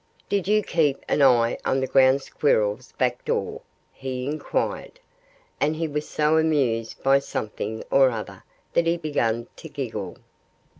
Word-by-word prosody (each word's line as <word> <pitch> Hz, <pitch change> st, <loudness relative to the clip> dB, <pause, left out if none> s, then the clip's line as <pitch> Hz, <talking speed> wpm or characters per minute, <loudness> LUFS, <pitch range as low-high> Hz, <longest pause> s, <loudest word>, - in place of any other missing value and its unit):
"Did 200 Hz, -2 st, 0 dB
you 210 Hz, +1 st, +3 dB
keep 150 Hz, -6 st, 0 dB
an 145 Hz, -, +1 dB
eye 120 Hz, -4 st, +4 dB
on 135 Hz, -, +1 dB
the 130 Hz, -, 0 dB
Ground 135 Hz, +1 st, +4 dB
Squirrel's 110 Hz, -4 st, 0 dB
back 125 Hz, -1 st, -1 dB
door?" -, -, -2 dB, 0.3 s
he 130 Hz, -1 st, -5 dB
inquired. 155 Hz, -, -3 dB, 0.6 s
And 150 Hz, +2 st, +1 dB
he 165 Hz, +1 st, -2 dB
was 150 Hz, 0 st, -4 dB
so 155 Hz, +1 st, +2 dB
amused 130 Hz, -8 st, 0 dB
by 135 Hz, +1 st, +5 dB
something 110 Hz, -4 st, -4 dB
or 135 Hz, -1 st, +6 dB
other 115 Hz, -3 st, -6 dB, 0.3 s
that 170 Hz, 0 st, +2 dB
he 170 Hz, +1 st, +2 dB
began 120 Hz, -8 st, -1 dB
to -, -, -10 dB
giggle. -, -, -5 dB
135 Hz, 150 wpm, -24 LUFS, 125-155 Hz, 0.6 s, or